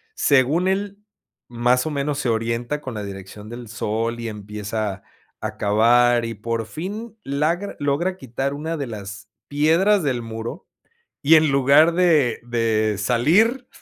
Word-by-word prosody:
Según 145 - +3
él 200 +1 -2 0.5
más 120 +1 +1
o 155 - -2
menos 145 0 -2
se 130 - -1
orienta 115 +5 -1
con 130 -4 -6
la 105 - -4
dirección 100 +1 -9
del 120 0 -8
sol 115 +1 -2
y 115 -1 -4
empieza 105 -1 -5 0.4
a - - -5
cavar 120 +3 +3
y 115 - -4
por 115 +2 -3
fin 205 - -7
logra, 160 +8 -1 0.4
quitar 135 0 -3
una 160 +3 -4
de 140 -3 -4
las 105 -1 -8 0.2
piedras 165 +8 +3
del 130 -4 -1
muro 115 +7 -6 0.6
y 150 +3 +5
en 155 -2 +4
lugar 140 +5 +5
de 165 -8 +3
de 115 -3 0
salir 210 - +2
125 Hz, 145 wpm, -22 LUFS, 115-155 Hz, 0.6 s, y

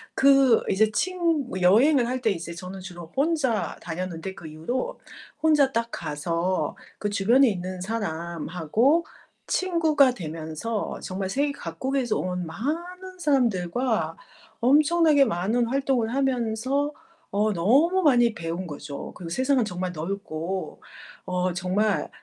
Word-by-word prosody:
그 270 -3 +5
이제 215 +2 +3
친 335 - 0 0.2
여행을 240 +8 +5
할 255 +1 -2
때 220 - +2
이제 170 -2 -5
저는 185 +2 -8
주로 175 -3 -10
혼자 275 -6 0
다녔는데 175 +1 -5
그 170 -4 -10
이후로 160 +12 -4 0.4
혼자 295 -4 +4
딱 230 -1 -1
가서 165 +5 -2 0.2
그 205 - -2
주변에 235 +7 +4
있는 185 -2 -4
사람하고 180 - 0 0.4
친구가 320 -7 +3
되면서 165 +6 -4
정말 190 0 -4
세계 285 +6 0
각국에서 250 +6 -2
온 180 -1 -2
많은 350 - -5
사람들과 230 - +1 0.4
엄청나게 300 +3 +5
많은 225 +4 0
활동을 260 -3 0
하면서 265 +1 0 0.4
어 210 +2 +1
너무 280 - +3
많이 240 -7 +4
배운 170 0 -4
거죠. 145 -2 -7
그리고 170 -2 -8
세상은 260 +5 +2
정말 180 -3 -3
넓고 180 +1 -4 0.4
어 180 0 -1
정말 190 +4 0
220 Hz, 255 characters per minute, -25 LUFS, 180-275 Hz, 0.4 s, 그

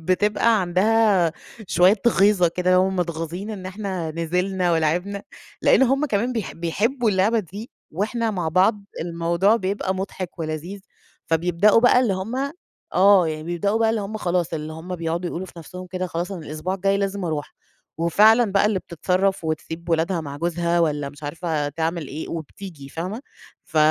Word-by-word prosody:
بتبقى 210 +5 +2
عندها 190 -1 +3 0.3
شوية 185 +4 +4
غيظة 195 -4 +4
كده، 180 +2 +1
هُم 190 +1 +2
متغاظين 170 +3 -3
إن 195 -4 -6
إحنا 185 -4 -4
نزلنا 180 +2 0
ولعبنا، 175 +5 0 0.4
لأن - - +5
هُم 275 +3 +2
كمان 235 +1 0
بيح 225 -5 -3
بيحبوا 215 +8 0
اللعبة 200 +4 +2
دي، 205 +4 -7 0.2
وإحنا 225 +6 -1
مع 180 -6 -2
بعض 195 +5 +2 0.2
الموضوع 170 +5 +1
بيبقى 190 -1 -2
مضحك 185 -1 -5
ولذيذ. 165 +5 -5 0.5
فبيبدؤوا 175 +6 +4
بقى 250 +1 +5
اللي 240 -6 +2
هُم 250 +9 -3 0.4
آه، 190 -2 +6
يعني 155 0 -4
بيبدؤوا 175 +6 -1
بقى 225 -1 +3
اللي 225 -1 -1
هُم 205 +2 -5
خلاص، 175 -3 -1
اللي 155 0 -5
هُم 170 +3 -6
بيقعدوا 170 +1 -2
يقولوا 185 +3 -5
في - - -14
نَفسهم 180 +3 -9
كده 185 0 -3
خلاص 175 +3 -4
أنا 170 -5 -7
الأسبوع 155 +5 -3
الجاي 195 +1 +1
لازم 200 -1 -2
أروح، 155 -3 -3 0.4
وفعلًا 215 +6 +4
بقى 200 +1 +4
اللي 210 -3 +1
بتتصرف 185 +2 -1
وتسيب 160 +2 -4
ولادها 165 +1 +1
مع 140 -2 -7
جوزها 170 +2 0
والّا 150 -3 0
مش 145 +2 -14
عارفة 155 -1 -2
تعمل 160 0 -3
إيه 155 +3 -6
وبتيجي 160 -2 -8
فاهمة، 185 - -5 0.4
ف 160 - -10
180 Hz, 165 wpm, -23 LUFS, 165-200 Hz, 0.5 s, آه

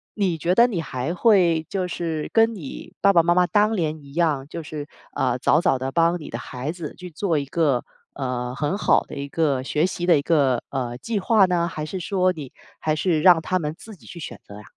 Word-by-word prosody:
你 195 -5 0
觉 175 +4 +1
得 235 - +7
你 210 -9 -1
还 135 +1 -3
会 180 -5 +3
就 185 -2 -2
是 165 -3 -3
跟 225 0 +4
你 155 -9 -9
爸 200 - +5
爸 170 - +6
妈 170 +1 +2
妈 180 0 +4
当 210 +3 +2
年 160 -4 -1
一 140 -1 -14
样， 150 -5 0
就 165 +2 -7
是， 150 -1 -7 0.3
呃， 125 -1 +1
早 150 +5 +3
早 135 - +2
的 130 +1 -4
帮 170 +3 +2
你 155 - -9
的 - - -4
孩 130 +4 -5
子 165 -3 -7
去 180 -1 -9
做 165 0 -1
一 140 - -1
个， 140 -4 +1 0.3
呃， 125 -2 -3
很 145 +5 -1
好 - - +4
的 - - -13
一 140 0 -5
个 145 -4 +1
学 150 +4 0
习 180 -1 -3
的 170 -3 +6
一 140 - -2
个， 140 -7 +2
呃， 125 -3 -3
计 220 - -3
划 210 0 +4
呢？ 175 -2 +1
还 155 -3 -5
是 185 +4 -5
说 185 +1 +1
你 145 -6 -8 0.3
还 155 -1 0
是 155 0 +1
让 175 -2 +6
他 185 +2 0
们 150 -1 -4
自 220 -1 -12
己 - - -19
去 170 - -9
选 160 - -8
择 100 - -11
呀？ 105 - -11
165 Hz, 255 characters per minute, -23 LUFS, 140-180 Hz, 0.3 s, 得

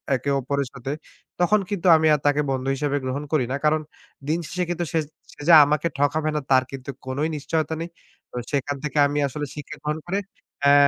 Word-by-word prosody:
একে 140 +2 -2
অপরের 140 +1 -1
সাথে 135 +2 -5 0.5
তখন 190 +4 +4
কিন্তু 195 -3 -1
আমি 160 0 +3
আর 150 - +2
তাকে 145 +1 +3
বন্ধু 130 0 -2
হিসেবে 145 +1 0
গ্রহণ 135 +3 -2
করি 145 -6 +2
না। - - 0
কারণ 155 0 +3 0.5
দিন 160 +3 +1
শেষে 180 0 -2
কিন্তু 175 0 -1
সে 165 - +2 0.3
সে - - -13
যে 170 - +8
আমাকে 150 +3 +1
ঠকাবে 155 +2 +1
না 150 - 0
তার 130 -1 +6
কিন্তু 135 0 -8 0.2
কোনই 140 +5 -1
নিশ্চয়তা 155 +2 -1
নেই। 170 - -4 0.4
তো - - -12 0.2
সেখান 145 0 -1
থেকে 150 0 -3
আমি 145 +1 -1
আসলে 145 +2 -4
শিক্ষা 150 +1 -7
গ্রহণ 150 +1 -1
করে 195 +3 -1 0.4
অ্যা 140 0 +6
150 Hz, 205 wpm, -24 LUFS, 140-160 Hz, 0.5 s, যে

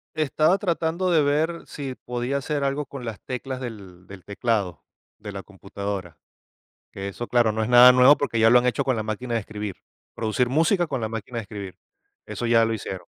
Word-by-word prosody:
Estaba 155 +4 +2
tratando 175 -1 -1
de 160 -3 +4
ver 155 +4 0
si 135 -3 -6
podía 125 +3 -2
hacer 145 +1 -2
algo 140 +1 -1
con 135 -2 -9
las 115 -3 -6
teclas 130 0 -5
del 100 -7 -9
del 100 -2 -12
teclado, 100 - -2 0.4
de 105 -1 -8
la 100 - -7
computadora. 100 -3 -6 0.7
Que 100 0 -6
eso, 120 +4 -6
claro, 120 -3 +3
no 110 +1 -2
es 110 - -2
nada 125 +1 +9
nuevo 130 +3 +6
porque 115 -5 -1
ya 115 0 +6
lo 125 - +7
han 125 - +2
hecho 125 - +1
con 130 -2 0
la 110 - -2
máquina 115 +3 -3
de 115 - 0
escribir, 105 -2 -6 0.4
producir 115 +2 0
música 165 +5 +2
con 125 - -3
la 110 - -1
máquina 115 +2 -6
de - - -1
escribir, 100 -2 -8 0.5
eso 120 - -4
ya 115 -1 +4
lo 115 - -1
hicieron. 95 -4 -6
120 Hz, 205 wpm, -24 LUFS, 105-140 Hz, 0.7 s, nada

